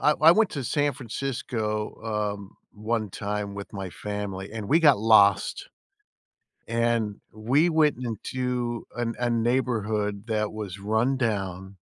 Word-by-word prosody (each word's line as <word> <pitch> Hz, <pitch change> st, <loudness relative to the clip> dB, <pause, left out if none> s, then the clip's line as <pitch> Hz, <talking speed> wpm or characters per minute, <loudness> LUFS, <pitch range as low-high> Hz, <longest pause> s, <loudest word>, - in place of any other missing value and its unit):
I 150 Hz, -, +5 dB
I 160 Hz, +2 st, +9 dB
went 220 Hz, +1 st, +3 dB
to 140 Hz, -4 st, -4 dB
San 145 Hz, +2 st, +1 dB
Francisco, 115 Hz, -4 st, -3 dB, 0.4 s
um, 100 Hz, -1 st, -13 dB, 0.2 s
one 110 Hz, -1 st, -2 dB
time 100 Hz, 0 st, -3 dB
with 100 Hz, +2 st, -8 dB
my 95 Hz, -2 st, -5 dB
family 100 Hz, 0 st, -5 dB
and 110 Hz, -3 st, -5 dB
we 160 Hz, -, +5 dB
got 145 Hz, -9 st, +6 dB
lost, 105 Hz, -2 st, +4 dB, 1.0 s
and 115 Hz, -3 st, 0 dB
we 130 Hz, +10 st, +2 dB
went 155 Hz, -4 st, +3 dB
into 120 Hz, +1 st, -3 dB
a -, -, -3 dB
n 115 Hz, -1 st, -1 dB
a 120 Hz, -, 0 dB
neighborhood 110 Hz, -4 st, 0 dB
that 105 Hz, -1 st, 0 dB
was 105 Hz, -3 st, -6 dB
run 110 Hz, +6 st, +1 dB
down 95 Hz, -5 st, -2 dB
110 Hz, 140 wpm, -26 LUFS, 105-125 Hz, 1.0 s, I